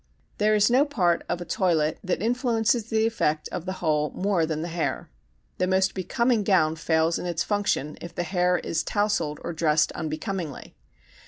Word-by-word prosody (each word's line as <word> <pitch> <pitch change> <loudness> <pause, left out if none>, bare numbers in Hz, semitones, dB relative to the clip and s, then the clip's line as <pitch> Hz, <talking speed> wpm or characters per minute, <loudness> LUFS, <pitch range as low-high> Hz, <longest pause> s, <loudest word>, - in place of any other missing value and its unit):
There 215 +1 +3
is 210 +2 +4
no 260 +3 +5
part 190 - +1
of 175 - -2
a - - -5
toilet 160 -5 +1
that 185 +1 -1
influences 235 -1 +1
the 220 0 +2
effect 155 -9 0
of 180 0 -5
the 185 - -1
whole 150 -1 +2
more 185 -4 +1
than 155 0 -2
the - - -3
hair. 170 - -2 0.5
The 185 - +2
most 190 +1 +2
becoming 235 +5 +1
gown 170 -6 +3
fails 160 0 +1
in - - -4
its 170 -1 -1
function 205 -8 -1
if 170 - -9
the 175 - -1
hair 180 0 +1
is 165 -1 -2
tousled 205 -8 -1
or - - -4
dressed 160 -1 +2
unbecomingly. 160 0 -5
180 Hz, 180 wpm, -25 LUFS, 160-210 Hz, 0.5 s, no